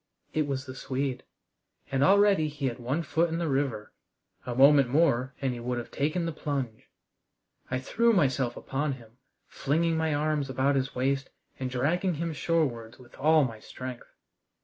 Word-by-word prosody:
It 155 -2 +1
was 135 -1 -3
the 130 - -7
Swede. 130 0 -3 0.7
And 135 0 +2
already 195 -3 +5
he 145 -2 -5
had 125 -1 -2
one 130 +7 -1
foot 165 +2 +1
in 165 - -2
the 170 -1 -1
river! 135 -7 -1 0.5
A 120 - -3
moment 140 0 +6
more 130 -3 +2
and 135 -2 -1
he 120 - -6
would 120 +1 -2
have 120 - -6
taken 155 +5 -1
the 165 - -1
plunge. 135 -7 -4 0.8
I 130 - 0
threw 230 - +2
myself 135 - +1
upon 140 +1 -2
him, 120 -1 -14 0.3
flinging 160 +4 0
my 160 0 +1
arms 150 -2 0
about 130 +2 +1
his 135 0 -1
waist 135 +1 0 0.3
and 130 -1 -2
dragging 160 +8 0
him 165 +1 -3
shorewards 135 -8 -1
with 120 -2 -16
all 155 +1 +5
my 115 -4 -4
strength. 125 +2 -8
140 Hz, 170 wpm, -28 LUFS, 130-155 Hz, 0.8 s, moment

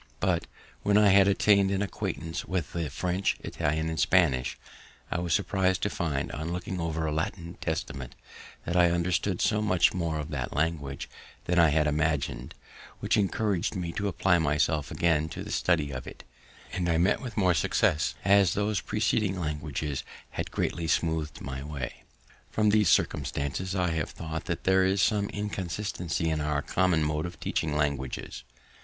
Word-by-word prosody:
But, 90 -2 0 0.3
when 105 0 +3
I 105 -1 +6
had 100 0 +6
attained 100 0 +4
an 100 0 0
acquaintance 80 -4 -4
with 90 -6 -3
the 85 -3 -2
French, 90 +7 -1
Italian, 80 +2 -1
and 80 -1 -3
Spanish, 70 -8 +3 0.5
I - - 0
was 85 -1 -3
surpris'd 95 -2 +1
to 105 - 0
find, 75 -6 -2
on 80 +4 -4
looking 90 0 -3
over 80 -1 -1
a 75 - -1
Latin 85 +2 -3
Testament, 70 -3 -4 0.5
that 85 - -2
I 90 -1 +6
understood 85 +2 0
so 105 -1 +2
much 90 -5 +3
more 85 -4 -1
of 75 0 -5
that 65 -4 -3
language 75 -3 -1 0.4
than 90 0 +2
I 85 -2 +6
had 75 +1 +2
imagined, 75 -5 -1 0.4
which - - +1
encouraged 100 -2 0
me 90 -2 -3
to 100 +4 -2
apply 90 -1 +2
myself 75 -1 +1
again 80 -2 +1
to - - -6
the - - -7
study 80 -5 +1
of 65 -1 -6
it, - - -10 0.5
and 90 -1 -1
I 85 - +3
met 90 +5 +2
with 120 -5 -7
more 90 -3 +4
success, 75 +1 +1
as 100 -2 +5
those 105 0 0
preceding 105 -3 0
languages 75 -2 -3 0.3
had - - -4
greatly 85 -1 -2
smooth'd 80 -1 0
my 65 0 -5
way. 70 -3 -6 0.5
From 105 -1 +2
these 105 -3 +4
circumstances, 90 +7 0
I 90 -2 +1
have 80 -2 -1
thought 80 -1 -6
that - - -3
there 95 0 +4
is 95 +1 +2
some 100 0 +2
inconsistency 95 -4 -2
in 80 -1 0
our 75 -1 0
common 90 -4 +2
mode 75 +2 -1
of 85 - -10
teaching 75 -2 -1
languages. 70 -3 -2
85 Hz, 170 wpm, -28 LUFS, 75-95 Hz, 0.5 s, I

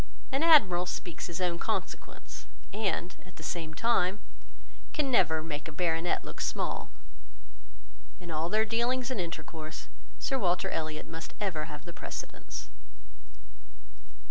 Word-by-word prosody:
An 270 +2 +2
admiral 205 - +7
speaks 175 -2 -3
his 170 0 -3
own 175 -2 +1
consequence, - - -3 0.3
and, 195 -4 0
at 185 -1 -15
the 160 - -10
same 160 -1 -2
time, 210 -3 +3 0.7
can 290 -3 +2
never 160 -8 +4
make 150 -1 -3
a - - -5
baronet 165 +1 +1
look - - -6
small. - - -1 1.3
In 175 -2 -7
all 160 +2 0
their 215 +3 +4
dealings 240 +3 +1
and 215 - 0
intercourse, 165 -1 -5 0.3
Sir 270 -1 0
Walter 180 -4 +2
Elliot 155 -1 -2
must 165 0 -7
ever 175 -7 0
have 150 -1 -8
the 175 - -7
precedence. - - -6
175 Hz, 135 wpm, -31 LUFS, 160-215 Hz, 1.3 s, admiral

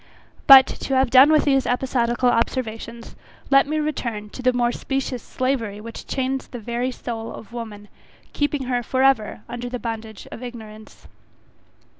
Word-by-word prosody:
But, 270 -1 +11
to 270 - -4
have 260 -2 +2
done 270 +4 +8
with 305 -1 +4
these 270 -3 +2
episodical 245 -1 0
observations, 230 -1 -3 0.4
let 275 0 +5
me 310 +1 -1
return 235 -9 -3
to - - -8
the 255 0 +3
more 240 -1 +1
specious 265 -1 -3
slavery 250 -6 -2
which 230 +1 -9
chains 265 0 -2
the 245 - -8
very 235 +2 -3
soul 230 -3 -6
of 230 - -11
woman, 215 -3 -7 0.5
keeping 290 -1 -1
her 250 -1 -1
for 260 +2 -1
ever 270 -6 +2
under 245 0 -6
the 250 - -4
bondage 225 -3 -6
of - - -8
ignorance. 220 -3 -11
245 Hz, 160 wpm, -22 LUFS, 230-265 Hz, 0.5 s, But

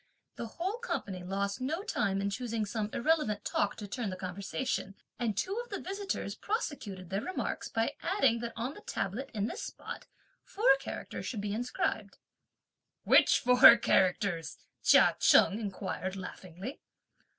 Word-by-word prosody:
The 230 - -5
whole 385 +7 -2
company 195 - -4
lost 200 +4 -2
no 315 +9 -2
time 195 - 0
in 200 0 -1
choosing 230 -1 -2
some 210 0 -3
irrelevant 235 -7 +1
talk 200 - 0
to 205 - -7
turn 220 +1 -3
the 185 - -4
conversation, 195 +3 -3 0.2
and 225 -5 -1
two 375 - -1
of 485 - -17
the 400 - -4
visitors 395 +1 -3
prosecuted 210 - -4
their 195 +2 0
remarks 370 +7 -3
by 225 +5 0
adding 270 - +2
that 235 0 -5
on 245 +5 -3
the - - -12
tablet, 220 +9 -3
in 205 -1 0
this 375 - -4
spot, - - -7 0.4
four 390 -9 +4
characters 270 - -6
should 220 -5 -3
be 205 0 -2
inscribed. 245 +3 -2 0.9
"Which - - +6
four 250 -1 +8
characters?" 185 -5 +1 0.2
Chia - - +6
Cheng 205 - +5
inquired, 190 -2 -4
laughingly. 190 - -8
220 Hz, 150 wpm, -31 LUFS, 195-270 Hz, 0.9 s, four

